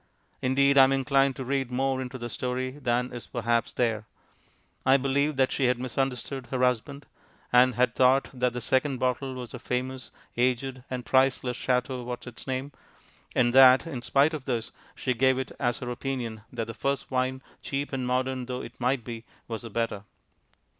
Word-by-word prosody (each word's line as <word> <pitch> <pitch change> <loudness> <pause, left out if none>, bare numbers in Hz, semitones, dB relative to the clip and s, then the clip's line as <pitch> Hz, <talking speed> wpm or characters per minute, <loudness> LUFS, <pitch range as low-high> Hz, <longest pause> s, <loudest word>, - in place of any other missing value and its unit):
Indeed, 140 +2 +4
I 135 - +10
am 135 - +1
inclined 135 0 +2
to 130 - -5
read 135 -1 -1
more 130 +1 0
into 130 0 -5
the 120 -1 -5
story 125 +2 -2
than 125 -2 -1
is 120 - -7
perhaps 115 -1 0
there; 110 -3 -1 0.8
I 130 +1 +5
believe 140 +2 +1
that 130 -1 +2
she 135 - +1
had 125 0 +3
misunderstood 130 +1 -3
her 130 -1 0
husband, 125 +4 0 0.5
and 125 0 +6
had 125 -1 +2
thought 130 +2 +4
that 125 -1 0
the 125 - -4
second 130 +3 +1
bottle 130 +1 -1
was 125 -3 -7
the 125 - -7
famous, 130 +1 -3 0.3
aged, 125 +1 0
and 125 -2 -4
priceless 130 -1 +2
Chateau 125 0 -1
Whatsitsname, 130 +3 -5 0.6
and 120 -1 +3
that, 130 +1 +8
in 140 -7 -5
spite 140 +5 +3
of 145 -4 -5
this, 120 -4 -2 0.2
she 125 - -1
gave 130 +2 +3
it 130 - -3
as 120 -2 0
her 125 -1 -5
opinion 120 -4 -4
that 115 -2 -3
the 115 - -7
first 140 +4 -2
wine, 130 0 -1 0.2
cheap 140 +1 -3
and 130 -2 -2
modern 130 0 -1
though 125 0 -3
it 120 - -11
might 125 0 +1
be, 115 -1 -7 0.2
was 115 -2 -4
the 115 - -7
better. 110 -2 -2
130 Hz, 180 wpm, -27 LUFS, 125-135 Hz, 0.8 s, I